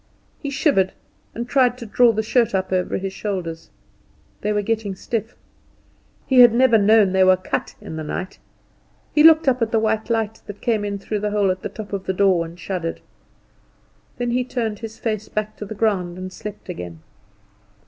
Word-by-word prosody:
He 285 - -3
shivered 270 - +2 0.4
and 235 +1 -4
tried 250 -2 +3
to 240 - -8
draw 235 +2 +4
the 220 0 -1
shirt 230 -1 +2
up 190 0 -1
over 185 -1 0
his 195 0 -4
shoulders. 180 -7 -4 0.7
They 210 - -1
were 210 0 0
getting 220 -2 -2
stiff. 225 +3 -4 0.9
He 260 -2 +3
had 240 -2 +8
never 240 -3 +5
known 210 -1 +5
they 190 0 +4
were 185 0 +5
cut 185 - -4
in 160 - -8
the 155 - -4
night. 185 +5 -5 0.7
He 300 - +4
looked 320 -1 +7
up 255 -2 +2
at 230 - +1
the 225 - +2
white 220 0 0
light 225 -1 -1
that 205 -1 -8
came 220 -3 0
in 200 -1 -2
through 210 +1 -3
the 210 +1 -1
hole 205 -2 +2
at 185 - -4
the - - -4
top 215 -2 -9
of 195 -1 -4
the 190 - +1
door 190 -3 +3
and 170 +2 -11
shuddered. 175 -2 -4 1.2
Then 245 -1 -1
he 250 +1 +1
turned 230 -4 -3
his 225 -1 -8
face 215 -2 -3
back 215 0 -3
to 210 - -6
the 215 - -7
ground 190 -5 0
and 185 0 -7
slept 210 +1 -8
again. 90 - -7
210 Hz, 200 wpm, -21 LUFS, 190-230 Hz, 1.2 s, had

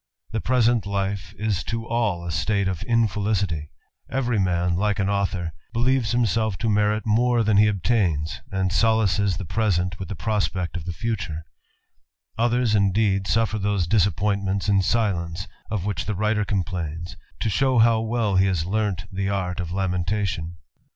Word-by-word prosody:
The 110 - -2
present 120 -4 +2
life 100 -1 -2
is 105 -4 -1
to 115 -1 -3
all 110 -7 -1
a 85 - -3
state 100 +4 0
of 95 -4 -2
infelicity; 100 -8 0 0.4
every 125 -4 0
man, 90 -2 +1
like 100 +2 +1
an 100 0 0
author, 95 -4 -1 0.2
believes 120 0 +2
himself 110 -4 +1
to 115 +1 -1
merit 105 +1 +1
more 120 +2 +3
than 105 -1 +3
he 105 +1 +6
obtains, 95 -6 0
and 95 -1 0
solaces 100 -4 +2
the 95 - -5
present 90 -3 0
with 95 - -6
the 100 - -4
prospect 95 -5 -1
of 85 -3 -5
the 90 - -3
future; 90 -7 -4 0.9
others, 120 0 +2
indeed, 100 -1 +2
suffer 110 -1 +1
those 100 -3 0
disappointments 100 0 +1
in 100 -2 +4
silence, 90 -4 -1 0.2
of 105 -4 -2
which 100 -1 -2
the 105 - -2
writet 105 +1 0
complains, 85 -4 -3 0.2
to - - -1
show 130 +3 +2
how 115 0 +5
well 110 -3 0
he 95 +1 +4
has 90 -4 0
learnt 100 -2 -1
the 95 0 -2
art 95 -3 -2
(^ 85 -2 -4
lamentation. 90 -2 -1
100 Hz, 160 wpm, -24 LUFS, 90-110 Hz, 0.9 s, he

